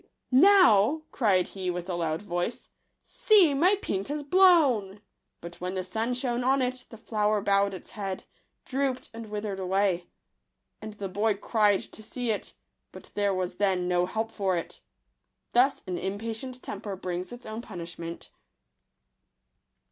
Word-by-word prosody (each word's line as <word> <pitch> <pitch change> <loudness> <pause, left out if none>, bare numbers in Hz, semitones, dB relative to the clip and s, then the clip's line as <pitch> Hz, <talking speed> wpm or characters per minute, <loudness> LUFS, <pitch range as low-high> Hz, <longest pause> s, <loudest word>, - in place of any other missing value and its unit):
" - - -47 0.2
Now," 310 - +5
cried 195 -8 +2
he 190 -2 -4
with 175 0 -4
a 185 - -3
loud 165 0 -2
voice, 175 +4 -3 0.2
" - - -51
see, 390 -9 +4
my 355 +9 +4
pink 195 0 -2
has 295 +1 -3
blown 280 - +4 0.2
!" - - -52
But 170 +1 -10
when 180 +1 -3
the 185 - -2
sun 225 +6 -2
shone 245 -1 -1
on 265 +2 +3
it, 255 0 -3
the 225 - -11
flower 215 -1 0
bowed 200 0 +2
its 185 - -10
head, 195 -3 -5 0.4
drooped, 265 -1 -2
and 225 -1 -8
withered 205 -2 -4
away. 190 -1 0 0.7
And 215 0 -7
the 200 -1 -5
boy 205 +3 +1
cried 205 -1 +2
to - - -10
see 240 +2 -3
it; 210 - -4 0.4
but - - -13
there 205 -1 +1
was 180 -1 -3
then 190 -3 +1
no 180 0 +2
help 220 +4 -3
for 190 -4 0
it. 170 - -6 0.7
Thus 260 +3 +3
an 180 -2 -3
impatient 225 +6 -5
temper 200 -1 -5
brings 180 -1 -5
its 245 +1 -10
own 220 +1 -5
punishment. 170 -5 -8
205 Hz, 165 wpm, -27 LUFS, 185-245 Hz, 0.7 s, Now